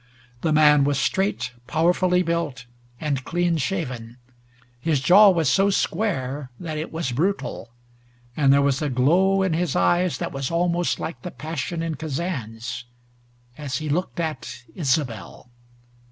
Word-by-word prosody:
The 160 - 0
man 150 -2 +6
was 140 0 +1
straight, 190 -2 0 0.2
powerfully 180 +3 +2
built 165 -7 -2 0.3
and 140 -4 -2
clean 175 +1 0
shaven. 130 - -3 0.6
His 150 +2 +1
jaw 195 +10 +7
was 165 -5 +2
so 195 +7 +3
square 145 -10 -1
that 155 -3 -4
it 155 - -5
was 160 -5 -3
brutal, 160 -3 -2 0.7
and 140 -3 +4
there 140 0 +5
was 140 0 +1
a 150 - 0
glow 180 +10 +3
in 185 -3 +1
his 170 -2 -1
eyes 175 - +2
that - - -4
was 135 -1 -3
almost 175 +1 0
like 165 - -5
the 180 - -5
passion 165 +1 -4
in 165 -1 -2
Kazan's 135 -7 -4 0.7
as 135 -4 -3
he 155 -1 -4
looked 175 +4 -2
at 155 -7 -4
Isobel. 130 -5 -2
155 Hz, 145 wpm, -23 LUFS, 135-175 Hz, 0.7 s, jaw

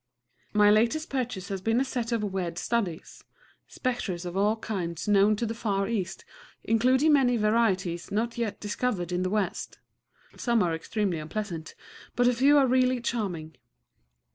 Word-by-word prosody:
My 210 0 +5
latest 235 +9 +2
purchase 245 -8 -3
has 195 -2 -3
been 225 +4 +1
a 270 - +1
set 245 -3 -3
of 230 -2 0
weird 185 -4 -3
studies, 195 -6 -3 0.4
spectres 200 -9 -3
of 175 0 -5
all 205 +3 +2
kinds 185 -7 -4
known 205 +1 +4
to 235 - -2
the 225 - -3
Far 200 -4 -1
East, 190 -5 -3 0.4
including 255 +7 +3
many 250 -4 +4
varieties 195 -6 +1
not 230 +3 -1
yet 225 -4 -3
discovered 205 -4 -2
in 180 0 0
the 185 - 0
West. 210 -1 -2 0.6
Some 235 -4 +1
are 170 -2 0
extremely 180 +1 -2
unpleasant; 165 0 -5 0.4
but 245 0 +3
a 250 - +4
few 275 +5 +5
are 280 - +5
really 255 0 +2
charming. 185 -10 -3
215 Hz, 160 wpm, -27 LUFS, 185-240 Hz, 0.6 s, My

